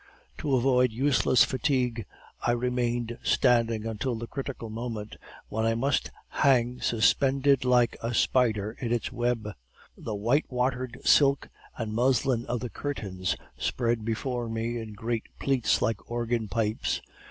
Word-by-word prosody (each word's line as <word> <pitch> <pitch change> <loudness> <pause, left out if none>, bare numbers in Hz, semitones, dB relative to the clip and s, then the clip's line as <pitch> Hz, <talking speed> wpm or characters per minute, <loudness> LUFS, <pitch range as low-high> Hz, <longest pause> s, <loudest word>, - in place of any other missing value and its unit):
To 145 -4 +1
avoid 125 -1 +3
useless 130 +1 +3
fatigue, 125 -4 0 0.3
I 120 - +2
remained 120 -1 -1
standing 115 -3 +2
until 115 +3 -2
the 115 +1 -5
critical 135 -2 -6
moment, 110 -2 -5 0.3
when 110 +1 -2
I 115 0 +2
must 135 +5 0 0.2
hang 125 -3 +2
suspended 135 +4 +3
like 125 -1 +3
a 115 - -2
spider 110 -5 +2
in 120 -2 -3
its 120 -1 -1
web. 120 -3 -1 0.4
The 110 - -5
white 120 +9 +1
watered 125 0 -1
silk 140 -1 +4 0.3
and 110 -3 -3
muslin 125 0 +1
of 120 -1 -2
the 125 - -4
curtains 95 -10 -3 0.2
spread 120 -2 0
before 120 +1 -2
me 115 +1 -2
in 110 -2 -7
great 115 +2 -3
pleats 135 -5 +1
like 115 -2 -2
organ 120 -1 -1
pipes. 110 +1 -1
120 Hz, 140 wpm, -27 LUFS, 115-130 Hz, 0.4 s, silk